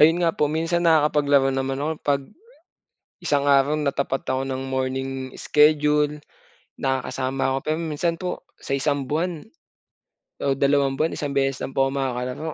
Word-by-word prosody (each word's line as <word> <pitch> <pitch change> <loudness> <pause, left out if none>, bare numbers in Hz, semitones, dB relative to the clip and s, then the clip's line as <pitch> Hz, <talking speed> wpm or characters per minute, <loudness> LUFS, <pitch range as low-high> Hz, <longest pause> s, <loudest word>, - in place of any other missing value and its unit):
Ayun 160 +3 +6
nga 165 -1 +2
po, 150 -1 +1
minsan 165 +2 0
nakakapaglaro 150 -4 +4
naman 135 0 -2
ako, 150 +2 -1
'pag, 140 -1 +1 1.0
isang 145 -1 +1
araw, 140 +1 +4
natapat 140 -2 -1
ako 130 0 0
ng 130 0 -3
morning 130 0 -2 0.3
schedule, 150 0 +3 0.6
nakakasama 130 0 -1
ako, - - 0
pero 155 +1 0
minsan 165 +1 -1
po, 180 -1 -4 0.2
sa 135 - -2
isang 140 -1 -1
buwan, 165 +1 -1 1.0
o 140 - +2
dalawang 140 -1 +2
buwan, 160 +3 0
isang 145 -1 -3
beses 135 -1 0
lang 135 - -4
po 135 0 +2
makakalaro. 135 +3 -3
140 Hz, 150 wpm, -23 LUFS, 135-150 Hz, 1.0 s, Ayun